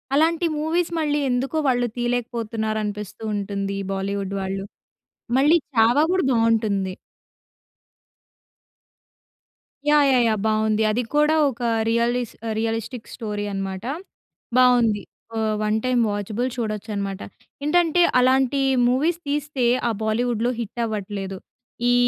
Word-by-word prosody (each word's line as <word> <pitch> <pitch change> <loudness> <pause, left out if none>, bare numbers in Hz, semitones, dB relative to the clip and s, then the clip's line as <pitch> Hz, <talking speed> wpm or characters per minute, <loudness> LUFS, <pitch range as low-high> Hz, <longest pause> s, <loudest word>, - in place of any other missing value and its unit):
అలాంటి 325 +3 +3
మూవీస్ 330 +3 0
మళ్ళీ 295 -1 +1
ఎందుకో 255 +5 -1
వాళ్ళు 245 -2 +2
తీయలేకపోతున్నారు 230 -3 -2
అనిపిస్తుంటుంది. 205 -1 -4
ఈ - - -4
బాలీవుడ్ 195 0 -3
వాళ్ళు. 195 +1 -3 0.7
మళ్ళీ 300 +5 +5 0.2
'చావా' 240 +6 +4
గూడా 370 -5 +1
బాగుంటుంది. 215 -5 +1 2.9
యాహ్! 295 -1 +5
యాహ్! 250 -1 +4
యాహ్! 215 -2 +1
బాగుంది. 215 0 +2
అది 235 +3 0
కూడా 300 +1 +4
ఒక 250 -2 -9 0.3
రియలిస్ 235 +1 0 0.2
రియలిస్టిక్ 225 +1 -3
స్టోరీ 210 -3 -4
అనమాట. 195 0 -4 0.7
బాగుంది. 240 -4 +4 0.4
ఆహ్, 220 -1 0
1 215 0 +1
టైమ్ 250 -1 +2
వాచబుల్ 210 +4 -2
చూడొచ్చు 220 -2 -4
అనమాట. 200 -1 -3 0.5
ఏంటంటే 345 +2 +3 0.2
అలాంటి 260 +1 +3 0.3
మూవీస్ 310 +7 +1
తీస్తే 290 -3 -1 0.2
ఆ - - +1
బాలీవుడ్‌లో 235 +2 0
హిట్ 235 +1 -4
అవ్వట్లేదు 200 -3 -4 0.5
ఈ - - +4
230 Hz, 110 wpm, -23 LUFS, 210-255 Hz, 2.9 s, మళ్ళీ